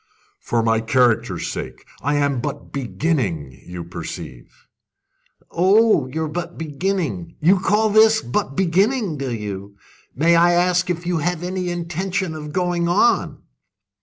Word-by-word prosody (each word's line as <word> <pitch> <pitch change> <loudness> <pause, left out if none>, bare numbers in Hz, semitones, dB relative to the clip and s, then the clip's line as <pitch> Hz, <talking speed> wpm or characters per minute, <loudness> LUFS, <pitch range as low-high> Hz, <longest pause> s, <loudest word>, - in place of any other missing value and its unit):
"For 115 -1 -1
my 115 0 +2
character's 120 0 +1
sake! - - -6 0.2
I 145 +2 0
am 140 -3 +1
but - - -6
beginning, 125 - -1 0.2
you 90 -1 -6
perceive." 85 -6 -8 1.0
"Oh, 190 - +4
you're 160 +4 -3
but 170 +3 -5
beginning! 170 +2 -3
You 180 +5 +4
call 210 +3 +2
this 220 +1 +6
but 135 - -2
beginning, 190 - +1
do 135 -2 -3
you? 100 -3 -6 0.4
May 165 +5 +4
I 175 +1 +5
ask 180 +1 +2
if 175 0 -2
you 175 -2 0
have 175 +1 -2
any 180 0 -2
intention 175 +1 -2
of 150 -1 -7
going 175 0 0
on?" 170 -4 +2
165 Hz, 135 wpm, -21 LUFS, 130-180 Hz, 1.0 s, this